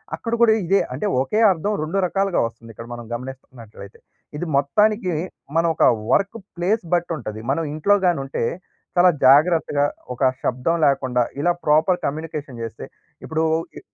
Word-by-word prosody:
అక్కడ 230 - -5
కూడా 230 -2 +6
ఇదే 195 +3 +3
అంటే 210 - -4 0.2
ఒకే 175 +11 -1
అర్థం 190 +4 -1
రెండు 160 +5 -3
రకాలుగా 195 0 0
వస్తుంది 115 0 -9
ఇక్కడ 115 +2 -10
మనం 120 -1 -8
గమనిస్తున్నట్లయితే. 120 -5 -10 0.4
ఇది 175 - -3
మొత్తానికి 205 - +2 0.4
మనం 165 +1 +3
ఒక - - +1 0.3
వర్క్ 200 +3 +1 0.2
ప్లేస్ 190 +5 0
బట్టి 175 0 +1
ఉంటది. 110 -5 -7
మనం 165 +4 0
ఇంట్లోగాని 180 0 +2
ఉంటే 135 - -3 0.5
చాలా 180 +1 +7 0.2
జాగ్రత్తగా 145 +1 +4 0.3
ఒక 130 +1 +2
షబ్దం 130 +7 0
లేకుండా 130 -3 +2 0.2
ఇలా 175 +5 +2
ప్రాపర్ 155 +4 +3
కమ్యూనికేషన్ 150 -4 -5
జేస్తే 115 -1 -6 0.4
ఇప్పుడు 160 0 -1 0.3
ఇ - - -6
155 Hz, 145 wpm, -21 LUFS, 130-180 Hz, 0.5 s, చాలా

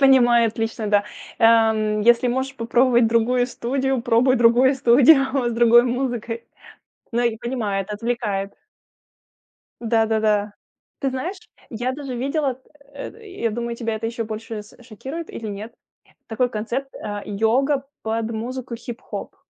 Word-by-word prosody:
понимаю 240 -4 +5
отлично, 225 0 -3
да. 205 0 +3 0.3
Ам, 220 -2 +4
если 240 +3 +4
можешь 265 +2 -2
попробовать 240 0 +3
другую 235 +2 +2
студию, 265 +1 -1
пробуй 245 +2 +3
другую 240 +3 +5
студию 265 +1 +4
с - - -3
другой 235 +1 +6
музыкой. 240 -2 -3 0.7
Ну 235 - +1
и 235 -2 +1
понимает, 215 -5 -3
отвлекает. 210 -3 -2 1.3
Да-да-да. 220 -2 +1 0.5
Ты 275 - 0
знаешь, 295 +10 -4 0.3
я 245 +3 -2
даже 270 -2 -6
видела, 270 0 -1 0.3
э, 280 - -7 0.3
я 230 - +2
думаю, 235 +1 -4
тебя 230 -2 -2
это 220 +1 -3
еще 230 0 -3
больше 220 0 -6
с 210 - -18
шокирует 265 +8 -7
или 225 - -7
нет. 210 +2 -6 0.6
Такой 245 +2 0
концепт, 240 +5 -4
э, 205 -1 -5
йога 255 +7 +1 0.2
под 225 +1 -2
музыку 240 +2 -5
хип-хоп. 235 +1 -8
235 Hz, 130 wpm, -22 LUFS, 220-255 Hz, 1.3 s, другой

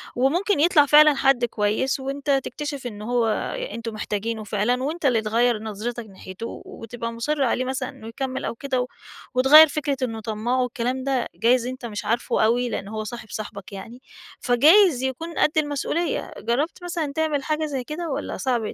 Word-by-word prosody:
وممكن 335 - +1
يطلع 300 -2 +5
فعلًا 300 +1 +7
حَدّ 270 -3 +3
كويس، 225 +4 0
وأنت 275 +2 -5
تكتشف 290 -4 -5
إنه 210 -2 -8
هو 240 -2 +2
أ - - -3
أنتم 230 -1 -5
محتاجِينه 215 +1 -3
فعلًا، 215 +5 0
وأنت 315 +2 -3
اللي 235 -4 +3
تغيّر 230 +2 +2
نَظرِِتَك 225 +2 -5
ناحيته 190 +1 -9
و - - -9
و 225 - -10
تبقى 230 0 -5
مُصِرّ 280 +5 -1
عليه 255 0 +1
مثلًا 260 0 -3
إنه 220 - -11
يكمّل 260 +3 -4
أو - - -3
كده 260 0 -1
و 250 - -3 0.5
وتغيّر 285 +5 +8
فكرة 285 -1 -2
إنه 225 -3 -2
طماع 220 +4 -2
والكلام 250 +1 -2
ده، 265 -3 0
جايز 240 +1 +3
أنت 255 -1 -6
مش 210 -1 -5
عارفه 230 +1 +1
أوي 245 +2 +1
لأن 200 - -4
هو 215 +1 -4
صاحب 225 0 -8
صاحِبك 205 -2 -7
يعني، 225 +6 -9 0.4
فجايز 295 - +5
يكون 320 +6 -4
قد - - +3
المسؤولية، 300 +3 -1
جرّبت 295 +9 -2
مثلًا 335 -5 -3
تعمل 310 -3 0
حاجة 310 +1 -1
زي 285 -3 -3
كده؟ 315 +5 -5
والّا 270 - -4
صَعب 240 -5 -1
250 Hz, 185 wpm, -23 LUFS, 230-290 Hz, 0.5 s, وتغيّر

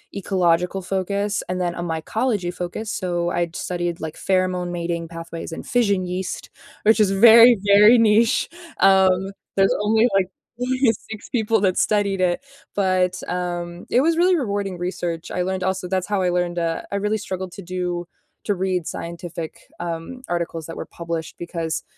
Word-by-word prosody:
ecological 180 -1 +1
focus, 200 +2 -1
and 180 0 -2
then 175 -1 0
a - - -4
mycology 175 +4 -1
focus. 180 +5 -5
So, 175 -5 -1
I'd 175 -1 -1
studied 175 -1 -3
like 160 -1 -5
pheromone 185 -2 0
mating 170 -1 -3
pathways 165 0 -7
and 165 - -7
fission 205 -8 +1
yeast, 180 +1 -4 0.3
which 220 +1 +4
is 210 -2 +4
very, 230 +4 +8
very 210 +4 +7
niche. 230 +1 +3 0.3
Um, 190 0 +4 0.2
there's 195 0 +4
only 220 +2 +4
like 195 -2 +3 0.3
only 255 +1 0 0.3
6 220 -1 -7
people 225 -2 +1
that 185 -3 +2
studied 200 -2 +1
it. 180 +6 +1 0.3
But, 185 -2 +1
um, 175 -1 -4
it 250 - +4
was 330 +3 +2
really 360 +1 +4
rewarding 200 - -2
research. 175 -2 -4
I 180 - -1
learned 185 +1 -2
also 190 0 -1
that's 185 0 -1
how 205 -2 0
I 180 - +2
learned, 175 0 0
uh, 165 -1 -1
I - - -2
really 210 +2 0
struggled 190 -3 -5
to - - -8
do 180 -1 -3 0.4
to 205 - +1
read 185 -2 -1
scientific, 170 -1 -6 0.2
um, 170 +9 -5
articles 170 -2 -3
that 165 - -7
were - - -5
published, 165 -1 -5
because 165 -2 -3
185 Hz, 165 wpm, -22 LUFS, 175-205 Hz, 0.4 s, very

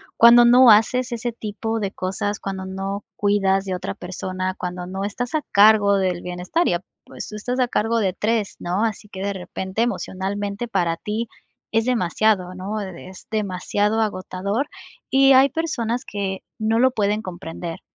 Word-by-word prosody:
cuando 240 +1 +8
no 245 0 +8
haces, 245 +4 +3
ese 235 0 -3
tipo 225 +1 -4
de 200 -2 -2
cosas, 195 +2 -3
cuando 190 -1 -5
no 195 +1 -4
cuidas 195 -1 +2
de 190 -1 -2
otra 180 - -4
persona, 185 +1 -4
cuando 180 0 -5
no 190 +1 -4
estás 245 +8 -3
a 310 - +1
cargo 205 0 +6
del 185 -2 0
bienestar, 180 - -1
y - - +2
ap 175 +2 -2 0.2
pues - - -9
tú 210 - -8
estás 245 +5 -3
a 250 - +3
cargo 230 -1 0
de 190 -4 +1
3, 215 +1 -1
¿no? 185 +6 0
Así 210 -1 -4
que 190 - -9
de 200 +1 -1
repente, 190 +2 -4
emocionalmente, 205 -1 -2
para 170 -6 +1
ti, 215 +6 -3 0.5
es 225 0 +3
demasiado 195 -4 +1
¿no? 200 +4 -4
E 195 -3 -5
de 175 - -11
es 185 - -13
demasiado 210 +1 0
agotador. 200 +5 -2 0.4
Y 270 0 +6
hay 265 +1 +6
personas 250 -6 -2
que, 195 -2 -3 0.2
no 220 +1 +1
lo 260 +1 +5
pueden 210 -2 0
comprender. 170 -3 -7
205 Hz, 175 wpm, -22 LUFS, 190-225 Hz, 0.5 s, cuando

